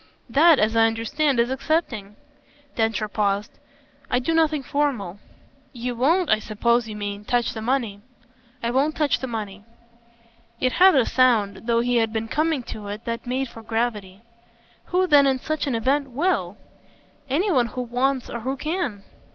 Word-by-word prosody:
"That, 315 +4 +6
as 220 0 +1
I 225 0 +5
understand, 250 +5 0
is 235 +2 +2
accepting." 265 -8 -2 0.6
Densher 220 -2 0
paused. 205 -1 -2 0.5
"I 250 - +2
do 255 +6 -1
nothing 315 -3 +2
formal." 250 - -2 0.5
"You 245 0 -4
won't, 325 +9 +2
I 215 - +3
suppose 235 +2 0
you 215 - -6
mean, 205 0 -5
touch 240 +2 0
the 220 - -6
money." 230 -4 -1 0.6
"I 235 - 0
won't 280 +5 +1
touch 295 -5 +1
the 260 - -4
money." 210 -4 -6 1.0
It 255 - +1
had 370 +2 +6
a 260 -4 +4
sound 230 -4 +2
though 235 0 +3
he 245 0 +1
had 225 -1 +1
been 225 0 -3
coming 310 -2 0
to 210 -3 -8
it 205 +2 -7
that 230 +1 -4
made 260 +2 -1
for 225 - -12
gravity. 220 -4 -3 0.6
"Who 365 +1 +1
then 290 -5 +5
in 265 -1 +2
such 310 +3 -3
an 260 - 0
event 270 +5 0
WILL?" 250 - -1 0.7
"Any 355 +10 +1
one 250 -7 +3
who 250 +2 -5
wants 250 +2 -1
or 235 - -5
who 260 +4 -3
can." 305 - -3
245 Hz, 170 wpm, -23 LUFS, 220-280 Hz, 1.0 s, That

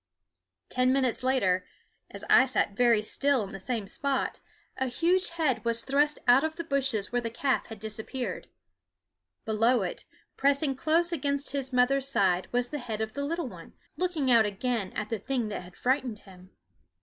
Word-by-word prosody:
Ten 255 0 +1
minutes 260 -3 +1
later, 200 -9 +1 0.5
as - - -9
I 260 - +6
sat 205 -5 0
very 235 -2 +3
still 275 +2 +1
in 195 - -8
the 195 - -7
same 225 +1 -3
spot, 275 +6 -1 0.4
a 265 - -1
huge 345 +9 +1
head 320 -7 0
was 230 0 +1
thrust 290 +2 +2
out 245 +3 +6
of 315 0 -2
the 335 - -5
bushes 270 -8 0
where 245 0 0
the 230 - -3
calf 265 +3 -1
had 225 -2 -9
disappeared. 220 +4 -4 1.0
Below 225 +1 +2
it, 180 - -5 0.3
pressing 280 +1 +2
close 325 +6 +1
against 280 -3 -1
his 275 -2 -3
mother's 260 +2 +3
side, 190 -9 +2
was 245 0 0
the 295 - -4
head 225 -4 -5
of 220 0 -3
the 280 - -3
little 330 +1 -2
one, - - -11 0.2
looking 335 -8 0
out 225 -3 +6
again 210 0 -2
at 215 -1 -4
the 225 -2 -2
thing 240 0 -2
that 205 - -4
had 180 0 -14
frightened 255 -3 0
him. 185 -2 -14
255 Hz, 180 wpm, -28 LUFS, 220-280 Hz, 1.0 s, I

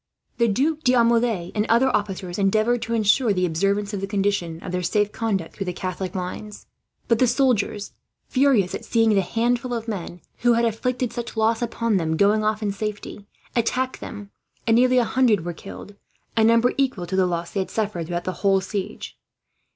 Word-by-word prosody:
The 235 - +4
Duc 285 +9 +1
d'Aumale, 235 - +2
and 210 +1 0
other 245 +3 +4
officers, 190 -3 -3
endeavoured 215 +4 +2
to 230 - -2
ensure 215 +1 +3
the 185 -1 +1
observance 200 +5 0
of 200 - -3
the 195 - -3
condition 195 -5 -1
of - - -5
their 180 0 -1
safe 205 +4 +1
conduct 200 -7 -2
through 195 - -5
the 180 - -2
Catholic 185 +1 -4
lines; 190 +3 -6 0.4
but 230 -1 +2
the 255 - +4
soldiers, 235 -5 +1 0.3
furious 255 -9 +2
at - - -5
seeing 225 -2 +2
the 195 - +4
handful 240 +5 -1
of 230 0 -5
men 180 -5 -5 0.2
who 240 0 +3
had 235 0 +2
inflicted 245 +2 -1
such 235 -1 -6
loss 225 +1 +2
upon 230 -2 0
them 160 -2 -1
going 210 +3 +3
off 215 0 0
in 205 - 0
safety, 205 0 -6 0.3
attacked 255 +2 0
them, 205 -2 -8 0.3
and 225 0 +4
nearly 255 +1 +4
a 245 - +5
hundred 225 -7 +2
were 175 - -3
killed 200 +4 -10 0.4
a 225 - +3
number 230 +2 +4
equal 255 -10 0
to 185 +2 -4
the 190 -1 +3
loss 170 -1 -3
they 200 - -2
had 190 - -2
suffered 205 -7 -2
throughout 175 0 -3
the 185 - -2
whole 195 -1 +4
siege. 190 +1 -5
210 Hz, 195 wpm, -23 LUFS, 190-235 Hz, 0.4 s, a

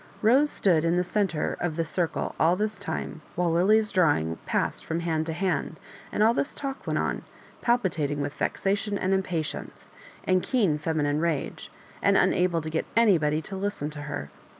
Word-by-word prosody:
Rose 265 +7 +5
stood 170 - +2
in 170 +1 +2
the 180 - +2
centre 185 -3 0
of 175 -3 -1
the 165 0 0
circle 165 +1 -2
all 165 +3 +4
this 215 +2 -2
time, 160 0 -4
while 175 -1 +1
Willie's 210 +6 +3
drawing 145 - +2
passed - - -1
from 165 +1 -2
hand 160 -1 -1
to 165 - -2
hand 185 +2 -1 0.3
and 210 - +2
all 225 +2 +5
this 280 - -2
talk 275 -1 -5
went - - 0
on, - - -1 0.4
palpitating 170 - +1
with 145 0 -2
vexation 200 +1 -1
and 190 0 0
impatience, 180 -5 -3 0.4
and 185 -1 +2
keen 195 - +1
feminine 150 -1 0
rage, 165 -4 -2 0.3
and - - +4
unable 175 -3 +2
to 155 - -4
get 160 - -1
anybody 160 -9 +3
to 195 - -6
listen 190 -6 -3
to 150 -1 -7
her. 75 - -5
175 Hz, 175 wpm, -27 LUFS, 155-200 Hz, 0.4 s, Rose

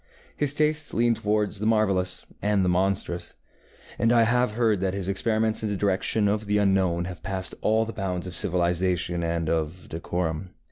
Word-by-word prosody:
His 145 -1 0
tastes 155 +1 +1
leaned 115 0 +3
toward 105 0 0
the 105 +1 -3
marvellous 100 -5 +1 0.2
and 100 -2 +2
the - - +2
monstrous, 90 -1 -1 0.6
and 115 - +3
I 120 -1 +5
have 125 0 +2
heard 110 -3 +2
that 95 0 -1
his 95 -2 -4
experiments 110 +3 +1
in 110 - -1
the 100 - -2
direction 100 +2 +1
of 105 +1 -1
the 105 0 +2
unknown 95 -4 +2
have 90 -3 -7
passed 95 +1 -2
all 110 +1 +2
the 115 - -6
bounds 95 -3 -3
of 90 - -6
civilization 90 0 0
and 85 -1 -1
of 80 +2 -2
decorum. 85 +1 -3
95 Hz, 180 wpm, -26 LUFS, 90-110 Hz, 0.6 s, I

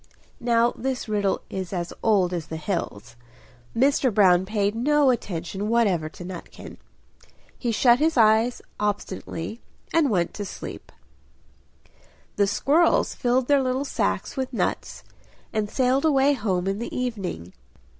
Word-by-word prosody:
Now 235 0 +2
this 260 0 -4
riddle 205 -2 0
is 190 -2 -5
as 175 -3 -3
old 195 -5 +2
as 165 -3 -4
the 160 - -5
hills; 125 - -4 0.6
Mr. 270 0 +3
Brown 190 -3 +4
paid 205 -1 0
no 285 +4 +3
attention 195 -2 -3
whatever 200 -9 +2
to 175 - -10
Nutkin. 180 -1 -9 0.8
He 240 - -2
shut 240 +2 +4
his 315 -1 +1
eyes 225 +2 +3 0.2
obstinately 205 -1 -4 0.3
and 325 -4 +3
went 175 -6 0
to 205 - -5
sleep. 195 - -8 1.4
The 200 -1 +2
squirrels 310 - +2
filled 250 0 +1
their 285 -1 +4
little 260 +2 -1
sacks - - -2
with 260 -2 -3
nuts, 240 - -3 0.5
and 215 -1 -1
sailed 260 +3 +1
away 285 -2 +4
home 195 -8 -1
in 195 +1 -1
the 235 - -5
evening. 195 - -4
215 Hz, 135 wpm, -24 LUFS, 190-255 Hz, 1.4 s, Brown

